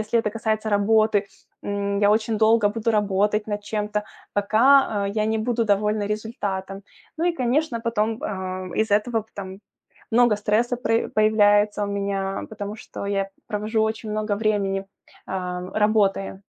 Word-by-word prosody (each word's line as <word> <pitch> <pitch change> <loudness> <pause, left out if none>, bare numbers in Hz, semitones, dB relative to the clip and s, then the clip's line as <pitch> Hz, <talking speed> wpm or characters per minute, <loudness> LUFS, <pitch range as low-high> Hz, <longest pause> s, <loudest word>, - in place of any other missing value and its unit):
если 220 +2 +1
это 210 - -2
касается 220 -1 -1
работы, 205 0 +3 0.4
м, 200 0 -1
я 205 0 +4
очень 220 +1 +1
долго 220 -1 +4
буду 225 +2 -1
работать 210 0 +1
над 205 -1 -3
чем-то, 210 -1 -2 0.3
пока, 220 +2 +4
э, - - -2
я 215 0 +1
не 220 0 0
буду 230 +1 0
довольна 210 0 +1
результатом. 200 -3 -4 0.4
Ну 335 - 0
и, 350 - +3
конечно, 260 -2 0
потом, 225 -1 -1
э, 185 -1 -3
из-за 220 -2 +2
этого 225 +1 -1
пт 220 - -30
там 190 -1 -7 0.5
много 235 -2 +4
стресса 220 +4 +1
пр 230 -1 0
появляется 210 -1 +3
у - - -3
меня, 195 -1 -2
потому 210 0 -6
что 200 - -8
я 195 -1 -1 0.2
провожу 215 +1 -1
очень 220 0 -2
много 210 -1 -1
времени, 200 -3 0 0.4
э, 180 -1 -4
работая. 205 -2 +1
210 Hz, 155 wpm, -23 LUFS, 200-220 Hz, 0.5 s, я